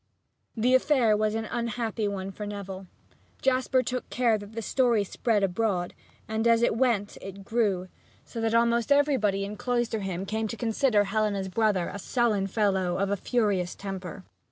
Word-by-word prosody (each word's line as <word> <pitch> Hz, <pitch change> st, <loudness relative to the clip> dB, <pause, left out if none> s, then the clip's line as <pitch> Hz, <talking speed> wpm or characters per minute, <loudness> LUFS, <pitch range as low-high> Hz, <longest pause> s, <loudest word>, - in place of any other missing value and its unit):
The 245 Hz, +3 st, +2 dB
affair 260 Hz, -4 st, +4 dB
was 215 Hz, 0 st, 0 dB
an 225 Hz, 0 st, -2 dB
unhappy 230 Hz, -1 st, -2 dB
one 195 Hz, -1 st, -4 dB
for 210 Hz, +1 st, -6 dB
Neville. 195 Hz, -2 st, -7 dB, 0.5 s
Jasper 260 Hz, -1 st, +2 dB
took 250 Hz, +1 st, -4 dB
care 240 Hz, -3 st, +2 dB
that 205 Hz, +1 st, -11 dB
the 230 Hz, -, -4 dB
story 240 Hz, -3 st, +2 dB
spread 210 Hz, +1 st, 0 dB
abroad, 190 Hz, -2 st, 0 dB, 0.3 s
and 220 Hz, +1 st, 0 dB
as 230 Hz, 0 st, +4 dB
it 225 Hz, -, +2 dB
went 230 Hz, -5 st, 0 dB
it 195 Hz, 0 st, -9 dB
grew, 200 Hz, -6 st, 0 dB, 0.4 s
so 230 Hz, -, -6 dB
that 225 Hz, 0 st, +1 dB
almost 235 Hz, +2 st, +2 dB
everybody 255 Hz, -9 st, +3 dB
in 210 Hz, +1 st, -7 dB
Cloisterham 220 Hz, -7 st, -2 dB
came 220 Hz, +2 st, -2 dB
to 230 Hz, -, -6 dB
consider 225 Hz, -1 st, +2 dB
Helena's 200 Hz, -2 st, -1 dB
brother 205 Hz, -3 st, +1 dB
a 200 Hz, -, -6 dB
sullen 215 Hz, -3 st, +1 dB
fellow 190 Hz, -3 st, +1 dB
of 195 Hz, 0 st, 0 dB
a -, -, +2 dB
furious 200 Hz, -4 st, 0 dB
temper. 190 Hz, -1 st, -7 dB
215 Hz, 165 wpm, -27 LUFS, 195-235 Hz, 0.5 s, affair